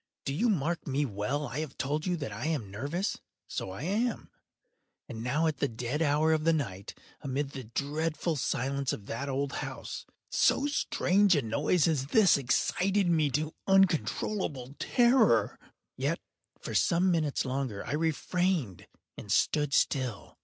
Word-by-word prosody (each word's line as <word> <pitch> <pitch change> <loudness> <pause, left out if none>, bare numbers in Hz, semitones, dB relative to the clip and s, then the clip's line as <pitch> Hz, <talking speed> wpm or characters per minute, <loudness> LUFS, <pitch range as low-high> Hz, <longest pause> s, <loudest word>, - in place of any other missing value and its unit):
—do 135 - -1
you 230 +11 +2
mark 170 -3 -1
me 140 +1 +1
well? 130 +6 -2
I 130 +4 -4
have 155 -4 -5
told 150 +5 -2
you 180 -1 0
that 145 -4 -5
I - - -4
am 135 -12 -2
nervous: 145 - -2 0.3
so - - -4
I 95 +8 -7
am. 220 +7 -1 0.8
And 110 - -7
now 145 +7 +1
at 155 -2 0
the 140 - +1
dead 125 +5 -3
hour 155 +1 +3
of 155 -1 0
the 165 - +4
night, 100 -11 -4 0.2
amid 140 +1 -2
the 130 -3 -7
dreadful 155 +6 -2
silence 135 0 -1
of 100 - -7
that 135 +7 -4
old 140 +1 -1
house, - - -6 0.2
so 280 - +3
strange 205 - +2
a 145 - +1
noise 145 +9 +2
as 145 -5 0
this 200 +3 +5
excited 185 +8 +1
me 155 -3 +3
to 150 +4 -1
uncontrollable 170 -6 +1
terror. 245 +2 +3 0.4
Yet, - - -1 0.4
for - - -6
some 180 +1 +3
minutes 155 -5 0
longer 130 -5 -3
I 125 - -3
refrained 160 - -1 0.3
and - - -7
stood 150 -2 +2
still. 130 -7 0
150 Hz, 160 wpm, -30 LUFS, 135-170 Hz, 0.8 s, this